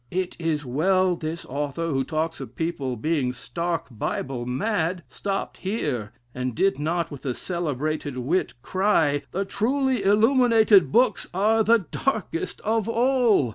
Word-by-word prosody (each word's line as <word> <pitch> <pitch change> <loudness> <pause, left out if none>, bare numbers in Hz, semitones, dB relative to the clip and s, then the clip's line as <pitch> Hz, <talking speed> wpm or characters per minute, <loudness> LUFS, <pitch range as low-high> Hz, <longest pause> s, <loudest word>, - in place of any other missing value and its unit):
It 185 0 -2
is 160 -3 -1
well 185 +8 +2
this 165 0 -5
author, 145 +4 -3
who 135 -1 +1
talks 160 +3 -2
of - - -8
people 150 -6 -2
being 135 0 0
stark 170 +5 -3
Bible 120 +2 -3
mad, 170 - -1
stopped 195 -1 -3
here; 145 - -2 0.2
and 125 -1 -3
did 195 +1 +2
not 165 +3 -1
with 145 - -9
a 130 -4 -2
celebrated 155 -4 -3
wit 140 +8 0
* - - -39
cry, 165 -7 +2
'The 195 +2 -2
truly 255 +4 0
illuminated 220 0 +5
books 245 +4 +3
are 220 +3 +3
the 230 +2 +5
darkest 220 -10 -2
of 220 0 0
all.' 235 - +3
170 Hz, 145 wpm, -25 LUFS, 145-210 Hz, 0.2 s, illuminated